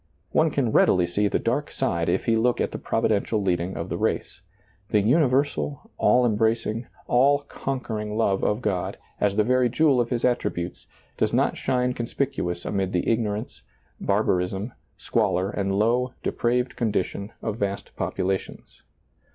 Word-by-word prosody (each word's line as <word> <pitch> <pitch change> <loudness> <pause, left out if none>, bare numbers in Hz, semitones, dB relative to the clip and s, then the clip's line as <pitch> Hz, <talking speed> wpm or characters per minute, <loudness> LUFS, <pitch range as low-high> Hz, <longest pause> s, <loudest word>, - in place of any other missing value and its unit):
One 160 0 +3
can 135 -6 0
readily 90 -4 +4
see 100 +4 +1
the - - +1
dark - - -1
side 85 -1 -1
if - - 0
he 115 - +3
look 120 +2 +2
at - - 0
the - - -5
providential 110 +1 0
leading 90 -2 -1
of - - -4
the - - -3
race. - - -2 0.5
The 105 - +3
universal, 140 +4 +1
all 125 0 +4
embracing, 115 +1 0 0.2
all 140 +4 +4
conquering 110 -7 -4
love 100 -4 +1
of 105 +4 0
God, 95 -4 -1 0.2
as 100 -1 +1
the 105 - +3
very 125 +2 +3
jewel 135 0 +3
of 120 - -2
His 120 -2 0
attributes, 95 -8 -2 0.3
does - - +1
not - - +2
.shine 125 -1 0
conspicuous 120 -8 -2
amid 95 -2 -1
the 90 - 0
ignorance, 110 0 -1 0.4
barbarism, 95 +5 0 0.2
squalor, 95 +3 0
and 95 -1 -1
low, 125 +4 +1
depraved 125 +1 0
condition 105 -2 -2
of 110 0 -3
vast 100 0 -3
popu - - -2
lations. 95 0 -4
110 Hz, 155 wpm, -25 LUFS, 100-125 Hz, 0.5 s, readily